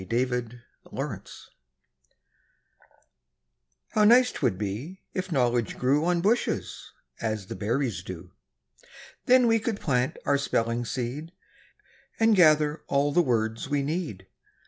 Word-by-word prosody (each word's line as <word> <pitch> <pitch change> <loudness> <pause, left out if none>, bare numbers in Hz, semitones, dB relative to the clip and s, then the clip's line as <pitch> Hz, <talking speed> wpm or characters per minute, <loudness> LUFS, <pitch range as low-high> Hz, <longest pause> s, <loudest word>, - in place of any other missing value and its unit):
EASY 125 0 -1 0.3
KNOWLEDGE - - -7 2.4
How 215 - +2
nice 245 +4 +6
'twould 120 -10 -1
be 110 - -5
if 185 0 -4
knowledge 120 -5 +1
grew 140 +5 +2
On 175 -1 +1
bushes, 220 +6 -1 0.3
as 110 -3 -2
the - - -7
berries 110 0 -1
do! 90 -1 -9 1.0
Then 250 0 +6
we 225 -1 +3
could 220 -1 -3
plant 125 -4 0
our 140 -1 +2
spelling 115 -3 -1
seed, 130 +8 -4 0.9
And 225 -1 +5
gather 155 -3 +4
all 140 +1 +1
the 175 - +4
words 115 -3 -1
we 145 -1 0
need. 145 - -4
140 Hz, 120 wpm, -26 LUFS, 115-175 Hz, 2.4 s, nice